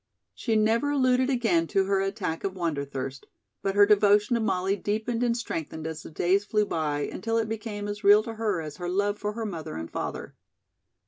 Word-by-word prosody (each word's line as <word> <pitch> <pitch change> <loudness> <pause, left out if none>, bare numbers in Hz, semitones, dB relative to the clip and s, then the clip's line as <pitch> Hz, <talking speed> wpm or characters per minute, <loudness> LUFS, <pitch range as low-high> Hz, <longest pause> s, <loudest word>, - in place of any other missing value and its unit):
She 225 -3 -1
never 225 +6 +2
alluded 260 -2 +2
again 220 -11 +2
to 195 - +2
her 195 0 +1
attack 195 -4 -3
of 195 -1 -2
wanderthirst, 140 -6 -4 0.3
but 195 0 -1
her 205 0 +7
devotion 205 +1 +4
to 235 - +2
Molly 195 -3 +1
deepened 220 +4 -2
and 240 -1 +1
strengthened 160 -8 -5
as 160 -1 -5
the - - -10
days 180 +5 +1
flew 210 0 +1
by 150 -5 -1
until 225 +9 -2
it 225 -1 0
became 215 -2 -4
as 205 +1 -5
real 205 +2 +7
to 230 0 -6
her 215 -6 -1
as 150 -2 -7
her 175 0 -4
love 205 +3 0
for 210 0 -2
her 225 0 -4
mother 165 - -5
and 80 +1 -6
father. - - -5
205 Hz, 200 wpm, -27 LUFS, 170-220 Hz, 0.3 s, her